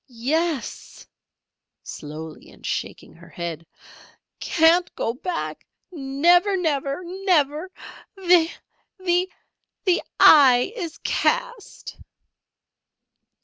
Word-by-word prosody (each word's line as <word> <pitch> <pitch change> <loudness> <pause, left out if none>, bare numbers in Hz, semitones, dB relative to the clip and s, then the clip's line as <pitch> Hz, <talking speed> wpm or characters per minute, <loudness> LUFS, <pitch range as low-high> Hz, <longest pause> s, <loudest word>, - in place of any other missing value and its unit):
"Yes!" 285 +5 -3 0.8
(slowly 155 +1 -9
and - - -16
shaking - - -5
her - - -17
head). 165 -2 -6 0.7
"Can't 340 +2 +3
go 230 - -2
back 335 +7 -5 0.3
again. 275 -3 -7
Never! 355 +4 +4
Never! 290 -2 -2
Never! 350 -3 0 0.5
The 355 -4 +3 0.5
the 365 0 -2 0.2
eye 265 - +6
is 340 -8 -6
cast!" 485 -3 -2
325 Hz, 80 wpm, -23 LUFS, 270-360 Hz, 0.8 s, eye